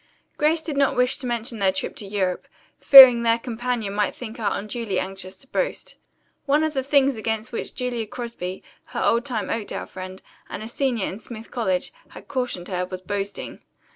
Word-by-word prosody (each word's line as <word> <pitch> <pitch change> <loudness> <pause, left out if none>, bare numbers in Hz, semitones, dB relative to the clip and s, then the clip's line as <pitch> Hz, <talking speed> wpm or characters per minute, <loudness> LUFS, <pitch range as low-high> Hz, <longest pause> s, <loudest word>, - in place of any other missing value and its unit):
Grace 315 +2 +2
did 310 -3 -4
not 275 -1 +3
wish 250 +2 +2
to 255 - -4
mention 235 -1 -2
their 195 -1 +3
trip 190 - -3
to 205 - -5
Europe, 190 -3 -2 0.3
fearing 260 -4 +10
their 230 0 +3
companion 235 -3 -3
might 205 -1 0
think 230 -3 -8
her 215 -3 0
unduly 215 -2 -2
anxious 190 0 -5
to 270 - -14
boast. - - -3 0.5
One 295 +3 +3
of 315 -1 -1
the 270 - 0
things 275 -1 +3
against 220 +1 -3
which - - -5
Julia 245 -3 -2
Crosby, 215 -6 -6 0.2
her - - -4
old 235 +3 +2
time 235 -7 -2
Oakdale 225 -3 -3
friend, 185 0 -8 0.3
and - - -6
a - - -6
senior 240 -3 -1
in 195 - -5
Smith 225 0 -10
College, 190 -7 -1 0.2
had - - -13
cautioned 250 -10 -3
her, 180 -2 -2
was 185 0 -6
boasting. 200 +1 -5
230 Hz, 190 wpm, -23 LUFS, 200-250 Hz, 0.5 s, fearing